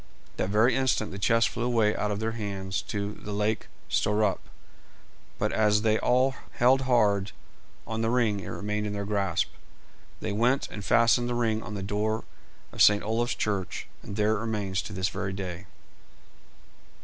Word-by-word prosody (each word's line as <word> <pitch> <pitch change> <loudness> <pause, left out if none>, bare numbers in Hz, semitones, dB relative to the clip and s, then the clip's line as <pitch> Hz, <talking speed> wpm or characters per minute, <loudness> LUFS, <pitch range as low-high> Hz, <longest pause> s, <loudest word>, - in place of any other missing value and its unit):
That 90 - -1
very 110 +5 +4
instant 130 -5 +1
the 95 - -6
chest 115 +3 +3
flew - - -5
away 115 -3 +2
out 105 - -1
of 105 0 -2
their 110 +1 -1
hands 100 -4 -3
to 100 0 -3
the 105 - -9
lake 105 +1 -1 0.2
Stöierup, 105 -1 +1 1.0
but - - -1
as 105 -1 +3
they 110 -1 +3
all 130 +2 +3 0.2
held 130 +2 +4
hard 100 -5 +3 0.5
on 110 0 -3
the 115 - +1
ring 115 -4 +2
it - - -8
remained 105 +1 -3
in 105 - -3
their 100 0 -3
grasp. 100 -4 0 0.7
They 110 - -3
went 120 +6 +2
and 105 - -7
fastened 120 +3 +3
the 120 - -1
ring 110 -2 +1
on 105 - -7
the 100 - -4
door 105 +3 -1 0.5
of - - -3
St. 105 0 +6
Olaf's 115 +3 0
church, 100 -4 -2 0.2
and 100 - -8
there 105 +1 +2
it - - -4
remains 105 -4 -2
to - - -8
this 95 -1 0
very 95 - -3
day. 95 0 -6
105 Hz, 175 wpm, -27 LUFS, 100-115 Hz, 1.0 s, St